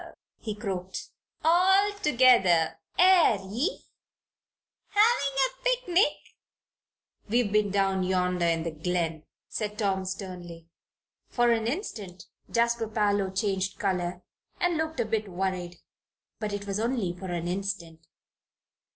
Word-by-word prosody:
he 215 Hz, -2 st, -5 dB
croaked. 190 Hz, -3 st, -5 dB, 0.3 s
"All 380 Hz, +5 st, +5 dB
together, 235 Hz, -, +4 dB, 0.2 s
air 360 Hz, -, +6 dB
ye? 215 Hz, -, -3 dB, 1.0 s
Havin' 410 Hz, -, +2 dB
a -, -, -27 dB
picnic?" -, -, +2 dB, 1.1 s
"We've 230 Hz, -2 st, +2 dB
been 210 Hz, -1 st, +2 dB
down 195 Hz, -1 st, +1 dB
yonder 180 Hz, -1 st, +1 dB
in 165 Hz, -1 st, +1 dB
the 165 Hz, -, -3 dB
glen," 165 Hz, -1 st, -2 dB, 0.2 s
said 210 Hz, -1 st, -4 dB
Tom, 195 Hz, -3 st, 0 dB
sternly. 180 Hz, -3 st, -7 dB, 0.6 s
For 240 Hz, -1 st, +2 dB
an 225 Hz, -1 st, +1 dB
instant 210 Hz, -, -5 dB, 0.2 s
Jasper 235 Hz, -1 st, +1 dB
Parloe 205 Hz, -2 st, +1 dB
changed 190 Hz, 0 st, -1 dB
color 180 Hz, -2 st, -2 dB, 0.4 s
and 355 Hz, -1 st, +1 dB
looked 320 Hz, 0 st, -2 dB
a -, -, +2 dB
bit 215 Hz, -1 st, -2 dB
worried. 180 Hz, -1 st, -3 dB, 0.6 s
But 215 Hz, -1 st, -3 dB
it 205 Hz, 0 st, -4 dB
was 200 Hz, 0 st, -2 dB
only 225 Hz, -6 st, -1 dB
for 185 Hz, +2 st, -8 dB
an 175 Hz, -1 st, -3 dB
instant. 175 Hz, -3 st, -4 dB
200 Hz, 120 wpm, -27 LUFS, 180-240 Hz, 1.1 s, air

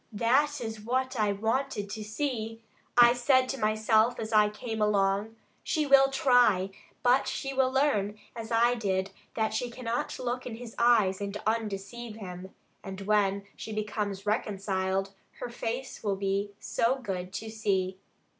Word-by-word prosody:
That 270 Hz, +7 st, +2 dB
is 220 Hz, -2 st, -5 dB
what 255 Hz, +2 st, -1 dB
I 210 Hz, -1 st, +3 dB
wanted 220 Hz, +1 st, -1 dB
to 215 Hz, 0 st, -5 dB
see. 225 Hz, -1 st, -3 dB, 0.3 s
I 240 Hz, 0 st, +8 dB
said 255 Hz, +1 st, +3 dB
to 270 Hz, -, -3 dB
myself 220 Hz, +2 st, +2 dB
as 220 Hz, 0 st, -4 dB
I 210 Hz, -1 st, +5 dB
came 220 Hz, +1 st, -5 dB
along, 205 Hz, +1 st, +1 dB, 0.3 s
'She 310 Hz, -2 st, 0 dB
will 275 Hz, -1 st, +6 dB
try, 245 Hz, -8 st, +3 dB, 0.3 s
but 250 Hz, +2 st, +4 dB
she 270 Hz, 0 st, -3 dB
will 265 Hz, -1 st, +3 dB
learn, 215 Hz, -7 st, +1 dB, 0.2 s
as 225 Hz, -1 st, -7 dB
I 235 Hz, +1 st, +4 dB
did, 195 Hz, -4 st, -1 dB, 0.2 s
that 220 Hz, -1 st, 0 dB
she 245 Hz, +2 st, -1 dB
cannot 235 Hz, -1 st, -3 dB
look 250 Hz, 0 st, -3 dB
in 230 Hz, -, -5 dB
his 230 Hz, -1 st, -9 dB
eyes 215 Hz, -5 st, +4 dB
and 200 Hz, 0 st, -3 dB
undeceive 220 Hz, +1 st, -3 dB
him. 185 Hz, -3 st, -8 dB, 0.3 s
And 190 Hz, 0 st, -7 dB
when 200 Hz, -1 st, +1 dB
she 220 Hz, -, -7 dB
becomes 210 Hz, -2 st, -3 dB
reconciled, 195 Hz, -2 st, -1 dB, 0.2 s
her 245 Hz, -, -6 dB
face 240 Hz, +2 st, -4 dB
will 200 Hz, -2 st, 0 dB
be 200 Hz, +1 st, -1 dB
so 235 Hz, +3 st, +1 dB
good 185 Hz, -7 st, -5 dB
to 220 Hz, +2 st, -5 dB
see.' 190 Hz, -4 st, -1 dB
220 Hz, 155 wpm, -29 LUFS, 200-245 Hz, 0.3 s, I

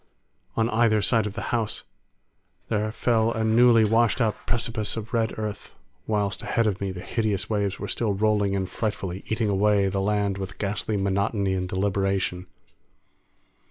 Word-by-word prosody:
On 115 Hz, -, +3 dB
either 110 Hz, -1 st, +3 dB
side 110 Hz, +1 st, +2 dB
of 105 Hz, -, -7 dB
the 115 Hz, -, -4 dB
house 115 Hz, -3 st, -1 dB, 0.9 s
there 110 Hz, -1 st, 0 dB
fell 115 Hz, 0 st, +1 dB
a 110 Hz, -, -1 dB
newly 115 Hz, 0 st, +5 dB
washed 115 Hz, +3 st, +3 dB
out 110 Hz, -4 st, -1 dB
precipice 115 Hz, -2 st, -1 dB
of 110 Hz, +1 st, -6 dB
red 115 Hz, -1 st, 0 dB
earth, 105 Hz, -2 st, -5 dB, 0.3 s
whilst 105 Hz, -2 st, 0 dB
ahead 115 Hz, -, 0 dB
of 100 Hz, -3 st, -1 dB
me 100 Hz, -1 st, -1 dB
the 90 Hz, -1 st, -7 dB
hideous 110 Hz, -1 st, -1 dB
waves 100 Hz, -2 st, 0 dB
were 100 Hz, -, -5 dB
still 105 Hz, -2 st, -1 dB
rolling 105 Hz, -1 st, +2 dB
in 95 Hz, -1 st, 0 dB
frightfully, 95 Hz, -2 st, -4 dB
eating 110 Hz, 0 st, 0 dB
away 100 Hz, 0 st, +3 dB
the 95 Hz, 0 st, -1 dB
land 100 Hz, -1 st, 0 dB
with 95 Hz, 0 st, -6 dB
ghastly 105 Hz, +1 st, -2 dB
monotony 100 Hz, 0 st, 0 dB
and 90 Hz, -1 st, -2 dB
deliberation. 95 Hz, -2 st, -1 dB
105 Hz, 160 wpm, -25 LUFS, 100-110 Hz, 0.9 s, newly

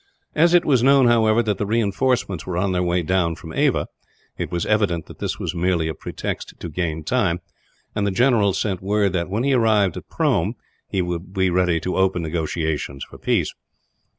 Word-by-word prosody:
As 170 Hz, +3 st, +4 dB
it 175 Hz, -, +4 dB
was 130 Hz, -5 st, +3 dB
known, 135 Hz, +1 st, +5 dB
however, 115 Hz, -1 st, +4 dB
that 105 Hz, -2 st, -1 dB
reinforcements 105 Hz, -, 0 dB
were 90 Hz, -2 st, -2 dB
on 95 Hz, +1 st, +1 dB
their 90 Hz, -1 st, 0 dB
way 90 Hz, 0 st, +1 dB
down 85 Hz, -1 st, +1 dB
from 80 Hz, -1 st, -10 dB
Ava, -, -, +1 dB, 0.5 s
it -, -, -4 dB
was 85 Hz, -1 st, -1 dB
evident 100 Hz, -7 st, +1 dB
that -, -, -13 dB
this -, -, -2 dB
was -, -, -3 dB
merely 85 Hz, -2 st, 0 dB
a 80 Hz, -, -2 dB
pretext -, -, -5 dB
to 85 Hz, -, -6 dB
gain 80 Hz, -1 st, -3 dB
time; 95 Hz, -4 st, +1 dB, 0.5 s
and 100 Hz, -1 st, 0 dB
the -, -, +2 dB
general 105 Hz, 0 st, +3 dB
sent 95 Hz, -1 st, -2 dB
word 100 Hz, 0 st, +1 dB
that, 85 Hz, -1 st, -1 dB
when 105 Hz, +5 st, -1 dB
he 140 Hz, 0 st, +2 dB
arrived 110 Hz, -7 st, +3 dB
at -, -, -9 dB
Prome, -, -, +1 dB, 0.3 s
he 95 Hz, -, 0 dB
would 90 Hz, +2 st, -5 dB
be 95 Hz, -1 st, +2 dB
ready 90 Hz, -2 st, +2 dB
to 90 Hz, -, -2 dB
open 95 Hz, -2 st, +1 dB
negotiations 80 Hz, -3 st, -2 dB
for -, -, -12 dB
peace. -, -, 0 dB
95 Hz, 195 wpm, -22 LUFS, 85-110 Hz, 0.5 s, known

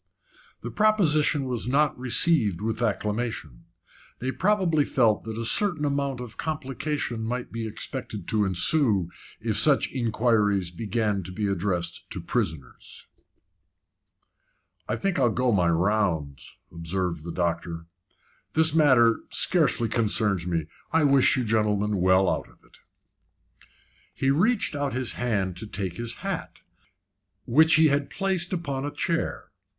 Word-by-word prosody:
The -, -, -6 dB
proposition 155 Hz, -9 st, +2 dB
was 125 Hz, -3 st, -1 dB
not 145 Hz, +4 st, +2 dB
received 125 Hz, -, +2 dB
with 110 Hz, +2 st, -3 dB
acclamation. 105 Hz, -, -3 dB, 0.5 s
They 130 Hz, +2 st, -3 dB
probably 185 Hz, -4 st, +1 dB
felt 115 Hz, -7 st, +1 dB
that 110 Hz, -1 st, -6 dB
a 115 Hz, -, -3 dB
certain 165 Hz, -, +1 dB
amount 140 Hz, -2 st, -1 dB
of 120 Hz, -3 st, -9 dB
complication 145 Hz, -5 st, -3 dB
might 125 Hz, +2 st, -4 dB
be 115 Hz, -1 st, -4 dB
expected 110 Hz, -3 st, -6 dB
to 110 Hz, -1 st, +2 dB
ensue 95 Hz, -, +3 dB, 0.3 s
if 110 Hz, -2 st, -2 dB
such 140 Hz, +5 st, +3 dB
inquiries 110 Hz, -6 st, +1 dB
began 105 Hz, +1 st, -2 dB
to 90 Hz, 0 st, -7 dB
be 105 Hz, +3 st, -3 dB
addressed 90 Hz, -3 st, -2 dB
to -, -, -4 dB
prisoners. 70 Hz, -6 st, -4 dB, 1.8 s
"I -, -, 0 dB
think 195 Hz, -3 st, -1 dB
I'll 120 Hz, -, +3 dB
go 125 Hz, +2 st, 0 dB
my 90 Hz, -5 st, +2 dB
rounds," 85 Hz, -, -1 dB
observed 85 Hz, 0 st, -3 dB
the 85 Hz, -, -6 dB
doctor. 85 Hz, -1 st, -3 dB, 0.7 s
"This 160 Hz, -1 st, +4 dB
matter 130 Hz, -8 st, +4 dB
scarcely 145 Hz, -9 st, +3 dB
concerns 105 Hz, -5 st, +2 dB
me. 85 Hz, -3 st, -1 dB, 0.3 s
I 165 Hz, -1 st, +2 dB
wish 140 Hz, -2 st, +4 dB
you 130 Hz, -, 0 dB
gentlemen 105 Hz, -2 st, 0 dB
well 95 Hz, +1 st, +3 dB
out -, -, -2 dB
of -, -, -24 dB
it." -, -, -20 dB, 1.4 s
He 135 Hz, -, +1 dB
reached 195 Hz, -, +1 dB
out 145 Hz, -2 st, -2 dB
his 125 Hz, -2 st, -1 dB
hand 100 Hz, -7 st, -2 dB
to 110 Hz, -, -6 dB
take 95 Hz, -4 st, -5 dB
his 115 Hz, 0 st, -2 dB
hat, -, -, -5 dB, 0.8 s
which 160 Hz, +6 st, +5 dB
he 155 Hz, 0 st, +5 dB
had 140 Hz, 0 st, 0 dB
placed 190 Hz, -3 st, 0 dB
upon 140 Hz, -7 st, -3 dB
a 145 Hz, -, -2 dB
chair. 165 Hz, +3 st, -3 dB
115 Hz, 135 wpm, -25 LUFS, 100-145 Hz, 1.8 s, which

